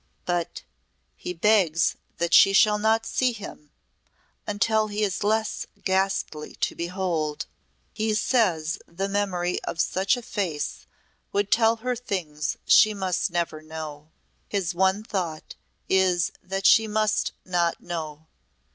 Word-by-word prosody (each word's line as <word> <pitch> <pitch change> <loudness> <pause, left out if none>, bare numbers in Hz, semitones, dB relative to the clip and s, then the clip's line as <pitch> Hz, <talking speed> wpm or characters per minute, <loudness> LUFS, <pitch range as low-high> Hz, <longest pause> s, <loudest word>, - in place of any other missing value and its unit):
"But 175 -2 -2 0.5
he 125 - -6
begs 180 -3 +3 0.2
that 170 0 -1
she 195 - +7
shall 210 +1 +5
not 220 +1 +2
see 255 -2 +1
him 195 -8 -10 0.8
until 215 +1 +1
he 210 0 -2
is 200 0 -1
less 220 +1 0 0.2
ghastly 190 -5 -1
to - - -1
behold. 170 -4 -2 0.5
He 215 0 0
says 185 -10 +1
the 190 +4 -3
memory 190 -3 -1
of 165 - -5
such 195 +7 +1
a 245 - -7
face 180 -10 -3 0.4
would 200 0 0
tell 225 0 +4
her 250 -1 +1
things 170 - -3
she 215 -1 +6
must 190 -1 -1
never 170 -3 -2
know. 155 -1 -8 0.4
His 190 -3 -1
one 190 +3 +2
thought 180 -8 -4 0.3
is 185 -2 +2
that 195 +1 -4
she 220 +2 +6
must 215 0 0
not 175 -2 0
know. 160 -3 -6
190 Hz, 130 wpm, -25 LUFS, 170-210 Hz, 0.8 s, she